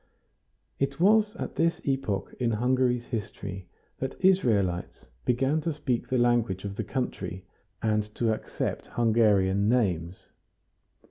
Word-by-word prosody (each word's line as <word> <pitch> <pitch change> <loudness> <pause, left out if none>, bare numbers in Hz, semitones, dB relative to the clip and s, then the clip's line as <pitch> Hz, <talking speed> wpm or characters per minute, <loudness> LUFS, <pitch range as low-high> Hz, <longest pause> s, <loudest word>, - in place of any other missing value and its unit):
It 140 +1 -1
was 210 +3 +4
at - - -6
this 165 +1 +2
epoch 135 -8 -1
in 120 -2 +1
Hungary's 125 +1 +1
history 100 -5 -5 0.3
that 135 0 -3
Israelites 110 - +2 0.2
began 135 +5 +2
to 165 - -1
speak 130 -5 -2
the 130 - 0
language 120 -6 +2
of 100 -1 -4
the 110 - -2
country, 100 -5 -4 0.4
and 105 -1 +2
to 115 -2 +1
accept - - -4
Hungarian 105 -4 +3
names. 95 -8 0
120 Hz, 125 wpm, -27 LUFS, 100-135 Hz, 0.4 s, was